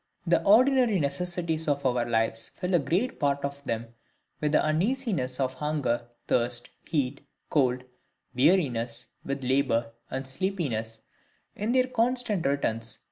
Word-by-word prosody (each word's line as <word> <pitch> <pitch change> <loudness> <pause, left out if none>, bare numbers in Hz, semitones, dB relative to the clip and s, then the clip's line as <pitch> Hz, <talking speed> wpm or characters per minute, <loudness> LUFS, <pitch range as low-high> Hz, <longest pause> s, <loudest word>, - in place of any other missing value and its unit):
The 170 -1 +3
ordinary 240 +1 +5
necessities 160 +2 -1
of 140 -1 0
our 120 -2 +1
lives 115 0 0
fill 180 +7 -4
a 175 - +5
great 185 - 0
part 140 -1 +1
of 140 0 -5
them 115 -1 -3 0.5
with 150 0 0
the - - +7
uneasinesses 170 - 0
of 130 -1 0
hunger, 130 -5 -1 0.2
thirst, 120 0 +1 0.2
heat, 140 -3 -1 0.3
cold, 125 -4 +2 0.5
weariness, 125 -5 +2
with 140 0 -3
labour, 120 -3 +1 0.2
and 130 +1 -3
sleepiness, 130 - -2 0.5
in 210 +3 -1
their 255 -1 +4
constant 240 - 0
returns, 115 -5 -1
&c. - - -17
140 Hz, 135 wpm, -28 LUFS, 125-180 Hz, 0.5 s, the